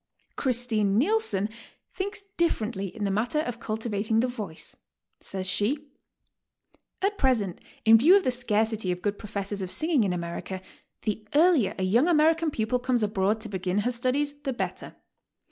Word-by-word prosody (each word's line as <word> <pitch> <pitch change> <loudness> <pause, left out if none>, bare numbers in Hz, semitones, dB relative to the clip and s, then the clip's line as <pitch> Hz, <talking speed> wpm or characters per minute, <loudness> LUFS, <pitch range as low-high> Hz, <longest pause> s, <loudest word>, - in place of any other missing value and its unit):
Christine 230 -6 +1
Nilsson 275 - +2 0.5
thinks 405 +2 -3
differently 220 - 0
in 210 +3 -7
the 200 - +1
matter 235 +9 +1
of 245 -6 -5
cul 215 0 -3
tivating 220 0 0
the 250 - +2
voice. 210 -10 -7 0.4
Says 190 -1 -4
she; 265 +10 -1 1.1
"At 405 +1 0
present, 225 -9 +1 0.2
in 225 0 +8
view 340 - +7
of 395 - 0
the 255 - +2
scarcity 220 -5 0
of 180 0 -4
good 205 -1 -1
professors 200 -1 -4
of 185 - -3
singing 310 - +2
in 195 - 0
America, 175 +2 -4 0.4
the 215 0 -3
earlier 310 - +4
a 190 - -2
young 225 +9 +3
A_merican 325 -1 +3
pupil 230 0 0
comes 245 -2 +1
abroad 205 +1 +1
to 220 - -6
begin 190 +1 -1
her 245 - +2
studies, 260 +4 0
the 275 -2 -2
better. 245 - -5
225 Hz, 160 wpm, -27 LUFS, 200-270 Hz, 1.1 s, in